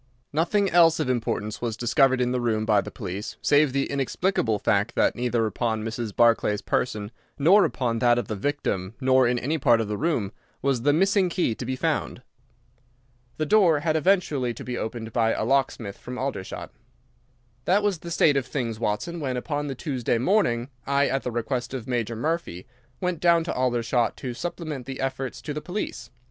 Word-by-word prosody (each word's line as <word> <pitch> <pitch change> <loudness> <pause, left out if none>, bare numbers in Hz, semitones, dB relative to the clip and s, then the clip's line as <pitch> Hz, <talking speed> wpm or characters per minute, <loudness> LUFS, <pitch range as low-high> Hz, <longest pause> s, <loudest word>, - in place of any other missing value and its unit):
Nothing 175 +6 +2
else 165 -2 +5
of 140 -5 +1
importance 110 -3 -2
was 115 -2 -2
discovered 130 +2 +3
in 125 0 +1
the 125 -1 0
room 110 -2 0
by 105 -2 +3
the - - -7
police, 100 0 -6
save 145 -1 +3
the 140 +1 0
inexplicable 140 - 0
fact 105 +3 0
that - - +2
neither 120 -2 0
upon 110 +1 -1
Mrs. 115 -1 -4
Barclay's 115 -3 +3
person 105 -3 -1 0.3
nor 185 +8 +6
upon 115 -4 -1
that 120 +1 +4
of 120 - -2
the 110 - -3
victim 100 -4 -2
nor 130 -1 +4
in 120 0 +1
any 150 +6 -1
part 120 -4 +4
of 110 - -1
the 105 0 -3
room 140 - 0 0.3
was 135 -3 0
the 145 +4 +3
missing 190 +4 +3
key 175 -9 0
to 120 - -6
be 130 - -1
found. - - -2 1.1
The 155 - 0
door 170 -4 +4
had 155 0 0
eventually 155 -8 +1
to - - -8
be 125 - -4
opened 110 -1 -5
by 115 -2 +2
a - - -2
locksmith 125 -6 0
from 125 0 -7
Aldershot. 130 -8 -4 0.9
"That 200 +3 +3
was 200 -5 0
the 170 - -8
state 150 -3 +3
of 135 - -1
things, 115 -6 -3
Watson, 115 +10 -2
when 130 -4 -2
upon 145 +3 -3
the 135 - -4
Tuesday 125 -4 -1
morning 125 - +1 0.2
I, 140 0 +2
at 135 - 0
the - - -3
request 120 +2 -3
of 125 - -5
Major 120 -2 -1
Murphy, 150 - -3 0.4
went 180 -3 -1
down 170 -1 +4
to 165 - -3
Aldershot 120 -1 0
to 125 -2 -5
supplement 150 -1 -5
the 135 -1 -6
efforts 135 +1 -4
of 150 - -2
the 150 - -4
police. 175 - -5
130 Hz, 190 wpm, -25 LUFS, 115-150 Hz, 1.1 s, nor